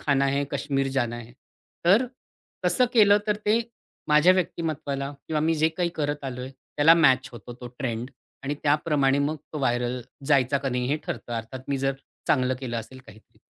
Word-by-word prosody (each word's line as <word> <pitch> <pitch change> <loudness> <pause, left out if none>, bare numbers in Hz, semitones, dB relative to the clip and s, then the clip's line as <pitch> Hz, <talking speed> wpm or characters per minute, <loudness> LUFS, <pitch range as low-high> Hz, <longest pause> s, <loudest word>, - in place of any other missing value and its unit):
खाना 140 -1 +2
है, 140 +1 +1
काश्मीर 135 -1 -1
जाना 120 -3 -1
है. 120 0 -11 0.5
तर 205 +9 +5 0.6
तसं 255 - +3
केलं, 205 -3 +6
तर 210 -1 +1
ते 210 +2 +1 0.5
माझ्या 150 +4 +6
व्यक्तिमत्त्वाला 155 -6 -2 0.2
किंवा 155 -1 0
मी 160 +2 +2
जे 160 0 +3
काही 170 +2 -1
करत 145 -1 -2
आलोय 125 -1 -5
त्याला 145 +4 +3
मॅच 130 -6 +4
होतो 120 0 -9
तो 125 - -7
ट्रेंड 120 -1 -3 0.3
आणि 140 +1 -2
त्याप्रमाणे 145 -2 +2
मग 145 +2 0 0.2
तो 155 - -3
व्हायरल 120 -1 0 0.3
जायचा 140 -1 +3
का 135 0 -2
नाही 125 -1 -1
हे 145 - +1
ठरतं. 120 - -5
अर्थात 115 +3 -5
मी 140 -1 0
जर 135 0 0 0.3
चांगलं 130 -2 +2
केलं 120 -3 -4
असेल 115 +3 -7
काहीतरी. 110 0 -18
140 Hz, 175 wpm, -25 LUFS, 130-155 Hz, 0.6 s, केलं